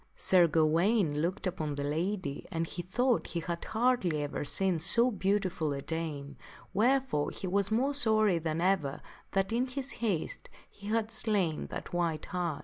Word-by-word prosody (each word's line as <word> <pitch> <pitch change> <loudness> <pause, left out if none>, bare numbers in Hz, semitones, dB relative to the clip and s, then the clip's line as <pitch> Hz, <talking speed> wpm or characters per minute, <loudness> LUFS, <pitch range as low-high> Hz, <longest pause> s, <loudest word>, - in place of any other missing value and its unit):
And - - -36
Sir 180 -2 +5
Gawaine 160 +1 +2
looked 175 +5 -2
upon 155 -5 -2
the 140 - -3
lady 160 0 -2
and 165 -2 -1
he 175 - -5
thought 245 +7 +1
he 170 - -3
had 170 0 -4
hardly 220 -10 +1
ever 145 - -3
seen 170 +5 0
so 235 +9 +3
beautiful 190 -6 0
a 140 0 -5
dame, 155 -3 -4 0.4
wherefore 245 - +2
he - - -6
was 195 +1 +1
more 255 +6 +1
sorry 215 -9 +3
than 160 0 -2
ever 175 -7 0 0.3
that, 195 +1 +1
in 245 +3 +1
his 270 +1 -4
haste, 205 -9 -2 0.2
he 205 - -12
had 220 0 0
slain 205 -8 0
that - - -7
white 170 -3 -1
hart. 175 -5 -2
180 Hz, 170 wpm, -31 LUFS, 160-220 Hz, 0.4 s, Sir